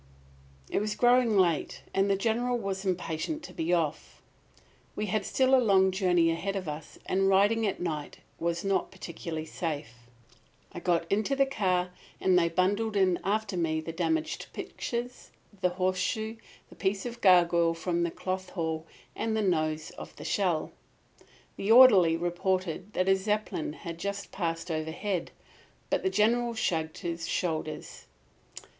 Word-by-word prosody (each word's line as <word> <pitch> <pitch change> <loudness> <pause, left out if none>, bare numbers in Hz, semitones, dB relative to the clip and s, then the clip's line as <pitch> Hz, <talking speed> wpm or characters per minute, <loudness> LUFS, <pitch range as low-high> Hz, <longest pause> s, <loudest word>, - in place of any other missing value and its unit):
It - - 0
was 210 +1 -2
growing 240 -1 +4
late 170 -5 +1
and 195 +1 +2
the 200 - +3
General 235 +4 0
was 195 -3 -3
impatient 185 - -2
to - - -9
be 165 +1 -2
off. 165 -4 -1 0.8
We 210 - -2
had 210 +1 -1
still 260 0 +2
a 260 - +7
long 190 -4 +4
journey 180 -3 +3
ahead 195 +4 -2
of 185 -3 -3
us, 150 0 -7
and 195 +1 +2
riding 205 +3 +4
at 195 - -2
night 155 -4 -4 0.2
was 170 0 -1
not 195 -1 +1
particularly 165 -3 -6
safe. 155 -5 -4 0.8
I - - -7
got 170 -1 +1
into 215 +7 +1
the 275 0 +4
car 185 -8 0 0.3
and 185 -1 +3
they 170 -1 +4
bundled 205 +5 +1
in 185 -3 +3
after 205 0 -1
me 160 -2 0
the 160 +1 -5
damaged 320 - -1
pictures, 245 +1 -5 0.3
the 180 - +3
horseshoe, 185 +5 -1 0.3
the - - -14
piece 195 +1 -1
of 240 -1 -6
gargoyle 170 -3 +5
from 170 0 -1
the 170 - +1
Cloth 185 +2 -4
Hall 160 -2 -3 0.3
and 220 -1 -1
the 215 - +1
nose 155 -4 0
of - - -9
the - - -10
shell. 180 -6 0 0.9
The 200 - 0
orderly 205 -10 +8
reported 180 +2 -2
that 185 - 0
a 195 - +6
Zeppelin 195 -5 -2
had 165 +1 -8
just 200 +1 -4
passed 165 -2 -3
overhead; 165 +4 -2 0.6
but - - +2
the - - +1
General 230 +4 +2
shrugged 160 -6 -1
his 170 -1 -4
shoulders. 155 -3 -3
185 Hz, 155 wpm, -29 LUFS, 170-210 Hz, 0.9 s, orderly